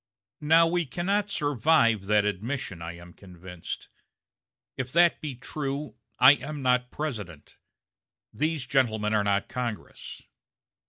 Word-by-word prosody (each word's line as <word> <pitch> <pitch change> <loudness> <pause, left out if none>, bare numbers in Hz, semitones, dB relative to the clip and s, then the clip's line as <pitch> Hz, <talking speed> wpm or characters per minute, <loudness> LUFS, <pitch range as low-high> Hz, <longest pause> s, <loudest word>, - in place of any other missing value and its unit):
Now 160 +3 +5
we 170 -1 0
cannot 195 +8 -1
survive 145 - +2
that 105 0 +3
admission, 105 -2 -3
I 85 +1 -6
am 85 0 -13
convinced. 90 -2 -9 0.9
If 130 0 -4
that 170 +1 +4
be 145 -4 -5
true, 140 +2 -4 0.2
I 130 +2 +9
am 145 +2 -6
not 125 -1 +2
President; 105 - -6 0.8
these 155 -2 -1
gentlemen 110 -6 +1
are 105 -1 +2
not 100 0 0
Congress. 120 -4 -6
125 Hz, 120 wpm, -27 LUFS, 105-150 Hz, 0.9 s, I